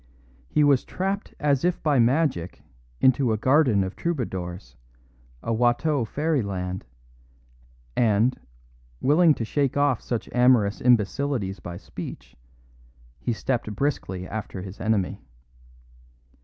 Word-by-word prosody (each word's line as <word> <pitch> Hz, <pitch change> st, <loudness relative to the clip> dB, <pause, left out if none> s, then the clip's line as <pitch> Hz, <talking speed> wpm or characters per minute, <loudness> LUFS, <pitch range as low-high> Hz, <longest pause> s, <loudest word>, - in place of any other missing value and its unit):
He 150 Hz, -, +3 dB
was 140 Hz, -3 st, +4 dB
trapped 195 Hz, +2 st, -3 dB
as 140 Hz, -3 st, +1 dB
if 180 Hz, 0 st, 0 dB
by 145 Hz, -4 st, +3 dB
magic 120 Hz, -, +1 dB, 0.4 s
into 130 Hz, -2 st, +4 dB
a -, -, 0 dB
garden 130 Hz, -4 st, +3 dB
of 95 Hz, +1 st, -5 dB
troubadours, 90 Hz, -, -4 dB, 0.7 s
a 115 Hz, -, -1 dB
Watteau 120 Hz, +4 st, +2 dB
fairyland; 100 Hz, -, -2 dB, 1.1 s
and, 115 Hz, +2 st, +3 dB, 0.6 s
willing 155 Hz, +2 st, +4 dB
to 115 Hz, -, -3 dB
shake 140 Hz, +3 st, 0 dB
off 145 Hz, -4 st, +2 dB
such 120 Hz, -2 st, -3 dB
amorous 125 Hz, -5 st, +3 dB
imbecilities 120 Hz, -2 st, +1 dB
by 85 Hz, 0 st, -7 dB
speech, -, -, -9 dB, 0.8 s
he 90 Hz, -, -2 dB
stepped 115 Hz, -2 st, -2 dB
briskly 95 Hz, -9 st, -2 dB
after 100 Hz, -3 st, -5 dB
his 95 Hz, +1 st, -9 dB
enemy. 100 Hz, -3 st, 0 dB
120 Hz, 115 wpm, -25 LUFS, 100-145 Hz, 1.1 s, was